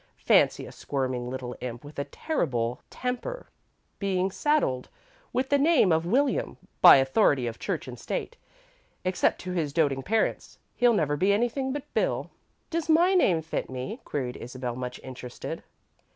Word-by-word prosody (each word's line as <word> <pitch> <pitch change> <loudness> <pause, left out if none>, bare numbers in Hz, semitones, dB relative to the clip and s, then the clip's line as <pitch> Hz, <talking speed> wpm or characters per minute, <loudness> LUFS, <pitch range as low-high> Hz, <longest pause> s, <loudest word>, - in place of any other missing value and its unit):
Fancy - - +4
a - - -10
squirming 130 -3 -3
little 125 -1 -5
imp 120 -1 -6
with 145 0 -9
a 140 - -1
terrible 125 - -2
temper 250 - -4 0.5
being 190 -1 0
saddled 280 - 0 0.4
with 260 +1 -1
the 285 - +3
name 290 - +4
of 160 +1 +2
'William,' 270 +8 +1 0.2
by - - +11
authority 135 - +3
of 115 -1 -5
Church - - -3
and - - -8
State. 480 - -4 0.7
Except 185 0 +1
to 185 - -5
his 160 -6 -1
doting 140 -4 +2
parents, 220 +9 -1 0.2
he'll 245 -1 +4
never 150 -8 +1
be 190 +7 +2
anything 240 +5 0
but 285 0 -3
'Bill.'" - - 0 0.4
"Does 335 -1 -2
my 345 +4 +5
name 180 - +3
fit 160 - -3
me?" 130 - -5
queried 125 -4 -3
Isabel, 125 0 -5
much 125 0 -5
interested. 125 -1 -7
165 Hz, 155 wpm, -27 LUFS, -, 0.7 s, by